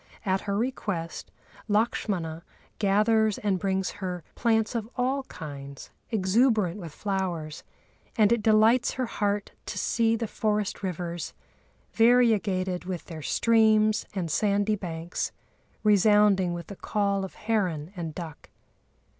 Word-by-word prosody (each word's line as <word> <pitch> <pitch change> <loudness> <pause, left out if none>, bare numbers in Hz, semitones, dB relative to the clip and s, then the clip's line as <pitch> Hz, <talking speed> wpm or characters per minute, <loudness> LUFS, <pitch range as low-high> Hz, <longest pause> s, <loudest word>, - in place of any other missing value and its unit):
At 190 -1 +1
her 200 - +1
request 205 -8 -3 0.4
Lakshmana 195 -6 -1 0.4
gathers 215 +1 +3
and 200 -3 0
brings 190 -1 0
her 180 -3 -4
plants 225 -1 +1
of 225 -2 -3
all 260 +2 0
kinds, 140 - -9 0.2
exuberant 210 -2 +2
with 170 -4 -7
flowers, 175 -4 -3 0.5
and 215 -1 +4
it 235 -2 +3
delights 220 +4 +4
her 255 - -1
heart 205 -3 -1 0.2
to - - -4
see 230 -1 +2
the 230 0 -2
forest 210 -1 -1
rivers, 175 -3 -4 0.6
variegated 210 -7 +3
with 180 -2 -5
their 160 -3 -8
streams 220 +3 +3
and 175 -4 -2
sandy 205 +5 +2
banks, 170 -3 -4 0.5
resounding 205 -3 +4
with 170 - -6
the 200 - -9
call 200 0 0
of 190 - -7
heron 185 -7 -1
and 165 -3 -5
duck. 165 -4 -8
200 Hz, 125 wpm, -27 LUFS, 180-220 Hz, 0.6 s, and